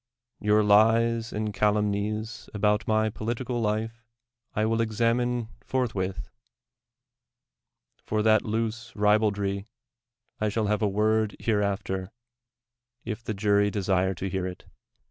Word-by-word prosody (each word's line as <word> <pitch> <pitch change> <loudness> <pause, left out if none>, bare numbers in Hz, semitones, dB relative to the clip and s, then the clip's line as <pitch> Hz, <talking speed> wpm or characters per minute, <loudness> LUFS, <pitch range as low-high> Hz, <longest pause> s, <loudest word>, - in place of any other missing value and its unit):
Your 105 +1 +3
lies 115 +2 +4
and 105 0 -3
calumnies 105 +1 -1
about 105 +1 +1
my 110 0 +2
polit 115 +3 -3
ical 125 -1 -3
life 110 +2 -2 0.5
I 105 - +2
will 115 +1 +1
examine 115 +1 0
forthwith; 105 -8 -2 1.8
for 105 0 -1
that 110 -1 +5
loose 115 +2 -3
ribaldry 105 -1 +1 0.7
I 110 - +1
shall 110 +1 -1
have 105 +1 0
a 105 - +3
word 110 +1 +1
hereafter, 100 -3 -1 0.9
if 115 0 -5
the 110 - -3
jury 100 0 +3
desire 95 -2 0
to 95 +3 -4
hear 95 0 -2
it. 90 - -8
105 Hz, 120 wpm, -27 LUFS, 100-115 Hz, 1.8 s, that